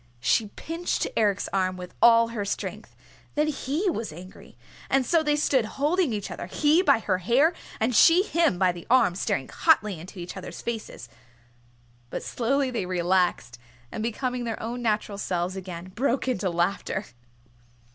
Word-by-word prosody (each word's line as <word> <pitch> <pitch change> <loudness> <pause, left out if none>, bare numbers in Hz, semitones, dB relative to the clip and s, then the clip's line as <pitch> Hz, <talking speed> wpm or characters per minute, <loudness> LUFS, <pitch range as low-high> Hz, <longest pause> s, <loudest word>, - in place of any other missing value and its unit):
She 215 - +2
pinched 330 +2 -2
Eric's 205 -3 +1
arm 185 -1 0
with 180 0 -9
all 230 -1 +6
her 225 -3 -3
strength. 200 - -5 0.4
Then 300 +1 +2
he 295 +6 -2
was 230 - -2
angry. 180 +4 -13 0.3
And 270 -1 +2
so 330 +3 +3
they 300 -1 +1
stood 270 -5 +2
holding 310 +2 +2
each 205 -3 -4
other, 175 - -6
he 300 - +3
her - - +3
by 280 -9 +4
the 185 -2 +1
hair, 255 - +3 0.3
and 230 +2 +1
she 335 - +7
him 335 - +1
by 185 -1 +3
the 175 -1 -10
arm, 245 -7 +4
staring 135 -7 -2
hotly 210 - +2
into 185 +4 -11
each 175 0 -7
other's 175 - -8
faces. 225 - -5 1.0
But - - -5
slowly 265 +2 0
they 215 -7 -2
relaxed, 175 -9 0 0.3
and - - -5
becoming 245 +2 -2
their 230 -2 -4
own 240 +2 -4
natural 210 -3 -1
selves 180 -1 -2
again, 185 -1 -7
broke 260 +3 0
into 200 -7 0
laughter. 185 +3 -1
220 Hz, 165 wpm, -26 LUFS, 185-270 Hz, 1.0 s, she